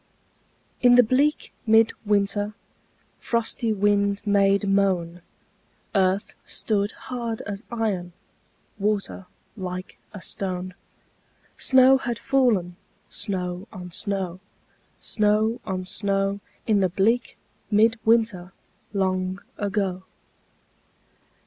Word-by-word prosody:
In 245 -1 +7
the 245 - +8
bleak 275 +6 +1
mid 225 0 +5
winter 205 0 +1 0.6
Frosty 230 0 -1
wind 200 -1 +2
made 200 0 +3
moan, 185 -3 +1 0.7
Earth 195 0 +1
stood 205 -1 -1
hard 235 -3 -5
as 200 +1 -6
iron, 200 -7 -2 0.7
Water 200 -2 -1 0.3
like 185 -2 -6
a 210 - -8
stone; 185 -1 -4 0.8
Snow 260 0 +5
had 240 -3 -3
fallen, 220 -10 +1 0.3
snow 185 -1 -2
on 180 -3 -9
snow, 190 -2 -2 0.6
Snow 215 +2 +1
on 185 -2 -3
snow, 195 0 -1 0.3
In 215 -2 +3
the 190 -1 +2
bleak 220 +7 +1 0.3
mid 225 +1 +4
winter 220 -5 +2 0.4
Long 185 -1 0 0.2
ago. 200 -3 -1
200 Hz, 95 wpm, -24 LUFS, 185-225 Hz, 0.8 s, the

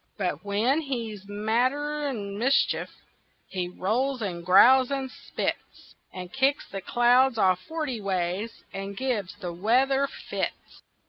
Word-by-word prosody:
But 180 -6 -2
when 220 +9 +1
he's 230 -8 -5
madder'n 245 +2 -1
mischief, 255 +6 +1 0.6
He 180 -2 -3
rolls, 245 +9 -1
and 175 -4 -4
growls, 250 +8 +6
and 270 -2 -3
spits, - - -5 0.2
And 180 -1 -8
kicks 270 +2 +1
the 195 - -6
clouds 245 +4 +3
all 185 -3 +4
forty 265 - -4
ways, 190 +3 -2
And 195 0 -6
gives 230 -9 -2
the 180 -4 -6
weather 260 +9 +2
fits. - - -6
225 Hz, 125 wpm, -26 LUFS, 195-265 Hz, 0.6 s, growls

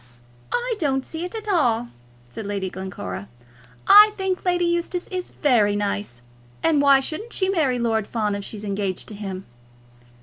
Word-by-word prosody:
"I 485 -1 -1
don't 270 -4 0
see 325 +2 -5
it 360 - -7
at 435 -1 -6
all," 240 - +1 0.4
said 200 - -8
Lady 195 -2 -3
Glencora. 100 - -6 0.6
"I 420 +1 +9
think 380 -2 -2
Lady 355 -1 +2
Eustace 345 +1 -1
is 365 -1 -4
very 220 -8 +2
nice. 200 -11 -3 0.4
And 315 -3 +3
why 280 -1 +6
shouldn't 325 - -5
she 380 -1 +1
marry 305 -10 +1
Lord 225 -3 0
Fawn 215 -3 -1
if 200 0 -4
she's 210 +1 -6
engaged 200 -2 -2
to - - -8
him?" 195 -2 -6
250 Hz, 165 wpm, -23 LUFS, -, 0.6 s, I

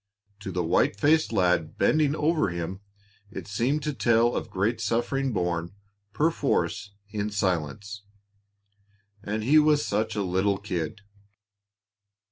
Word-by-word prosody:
To 95 -1 -6
the 90 0 -1
white 90 +4 +1
faced 155 +4 +3
lad 90 -3 +1
bending 155 -1 +2
over 155 - +1
him 85 +2 -4 0.5
it 110 - -8
seemed 125 +9 0
to 150 0 -2
tell 120 -2 +2
of - - -3
great 110 +5 -1
suffering 120 +5 0
borne, 90 -3 -2 0.4
perforce, 135 -10 0 0.2
in 105 0 -2
silence 100 +1 -2 1.2
and 105 +1 -3
he 150 +7 +5
was 150 -1 +3
such 110 +2 -1
a 105 - 0
little 95 +2 +1
kid! 95 -1 -4
105 Hz, 125 wpm, -26 LUFS, 95-135 Hz, 1.2 s, he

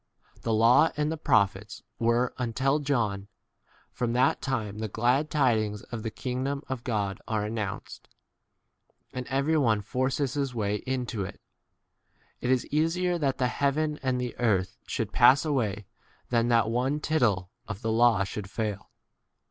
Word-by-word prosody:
16 - - -24
The 115 - -1
law 120 +8 +5
and 150 +1 0
the - - -1
prophets 100 -7 +1 0.2
[were] 120 +2 +2
until 130 +4 +1
John: 115 -9 -1 0.6
from 120 -1 -2
that 125 +2 +2
time 110 -6 -3
the 110 - -2
glad 125 +8 +1
tidings 110 -8 +1
of 115 - -3
the 115 - -3
kingdom 130 +5 -3
of 130 -3 -4
God 100 -5 -2
are 110 -2 -1
announced, 105 -3 -5 1.0
and 125 -1 -5
every 140 +4 +1
one 115 -7 +3
l? - - -5
forces 130 +4 -1
his 140 -4 -2
way 105 -2 0
into 125 -5 -2
it. 95 - -8 1.0
It 125 - -2
is 130 -1 +2
easier 175 +3 +1
that 135 -3 0
the 130 - +1
heaven 150 +3 0
and 130 -2 0
the 125 -1 -3
earth 100 -6 +1
should - - -3
pass 140 +4 +6
away 110 -9 -1 0.5
than 115 -1 +2
that 115 -2 +3
one 125 +4 +1
18 150 - -5
tittle 110 - +1 0.2
of 105 +1 -6
the 110 - 0
law 115 -3 +4
should 100 0 -6
fail. 105 -2 -4
120 Hz, 165 wpm, -28 LUFS, 110-135 Hz, 1.0 s, pass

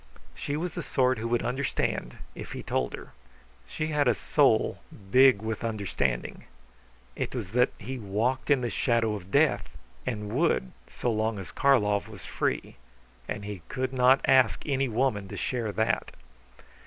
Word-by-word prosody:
She 145 - -3
was 175 +2 -2
the - - -5
sort 130 -2 +1
who 115 - -2
would 120 0 0
understand, 130 +3 -2 0.2
if - - -8
he - - -6
told - - -1
her. - - -11 0.6
She 155 - -3
had 150 -3 +2
a 120 - +4
soul - - +2 0.3
big 130 -4 +6
with 110 0 -3
understanding. 100 - -2 0.7
It - - -3
was 90 - -4
that 125 +2 +3
he 130 +5 -6
walked 115 +7 -1
in 140 -3 +4
the 120 - -2
shadow 115 -3 +1
of 95 -3 -7
death, 65 -8 +2 0.3
and 105 -4 -4
would 130 - +1 0.2
so 120 - -2
long 110 0 0
as 95 - -7
Karlov 105 -7 +2
was 105 -5 -10
free; - - -2 0.5
and 100 - -4
he 100 -3 -6
could 130 0 -2
not 130 +1 +5
ask 130 -4 +4
any 135 -2 +1
woman 115 -4 0
to - - -7
share 120 -4 -2
that. 110 +2 0
115 Hz, 165 wpm, -28 LUFS, 105-130 Hz, 0.7 s, big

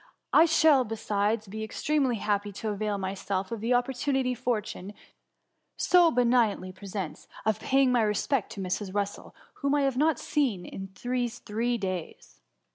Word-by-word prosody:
I 320 - +8
shall, 315 -4 +5
besides, 215 -1 -1
be 215 +3 -5
extremely 270 +3 0
happy 205 -1 -1
to 215 +3 -4
avail 210 0 -1
myself 190 0 -3
of 230 -3 -4
the 240 +2 +2
opportunity 260 +1 0
fortune 215 -5 -3 0.8
so 355 -2 +5
be 245 -4 +2
nignantly 230 -6 +2
presents, 190 -3 -6 0.2
of 220 -1 +1
paying 270 -1 +3
my 245 -2 +3
respects 220 +2 0
to 200 - -5
Mrs. 190 +1 -3
Russel, 205 0 -3 0.3
whom 280 0 +2
I 290 - +2
have 270 -2 0
not 310 +2 +3
seen 200 - -2
these 245 -1 -1
three 235 +3 -1
days.'' 185 -5 -6
225 Hz, 150 wpm, -28 LUFS, 200-255 Hz, 0.8 s, I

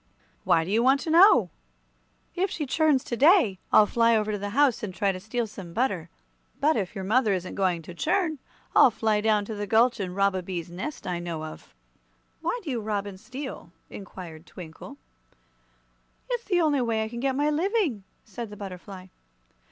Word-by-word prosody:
"Why 170 -3 +4
do 180 - -5
you 225 +2 +3
want 265 +3 +4
to 320 - -3
know?" 320 - +6 0.8
"If 380 +2 0
she 310 -4 -3
churns 300 -1 +2
to 240 - -4
day, 265 - +4
I'll 215 - +7
fly 230 +2 +3
over 215 0 -1
to 210 - -2
the 205 +1 -4
house 285 -5 +4
and 210 - -4
try 200 -1 +1
to 185 - -6
steal 230 +5 -2
some 195 -5 -10
butter. 190 -8 -1 0.5
But 310 +2 +3
if 200 -1 -3
your 195 - -4
mother 215 +1 +2
isn't 185 -1 -4
going 180 -4 0
to 175 - -9
churn, 315 - 0 0.4
I'll - - +8
fly 220 -2 0
down 215 -1 +3
into 205 +2 -6
the 205 -1 -4
gulch 230 +3 +3
and 185 -2 -4
rob 200 0 +2
a 185 - -2
bees' 175 -2 -6
nest 230 - -6
I 175 -1 -2
know 165 -2 -5
of." 155 - -11 0.7
"Why 340 +9 -1
do 305 - -4
you 240 -3 -2
rob 205 -1 -2
and 195 -2 -8
steal?" 255 -5 -8 0.2
inquired 175 -5 -10
Twinkle. 160 -3 -11 1.3
"It's 485 -1 -2
the 360 -3 +2
only 295 -4 +2
way 225 -2 0
I - - -3
can 235 +1 -7
get 265 +1 0
my 295 +2 +1
living," 330 - 0 0.2
said 225 +1 -7
the 210 - -10
butterfly. 190 -1 -9
215 Hz, 200 wpm, -26 LUFS, 190-270 Hz, 1.3 s, I'll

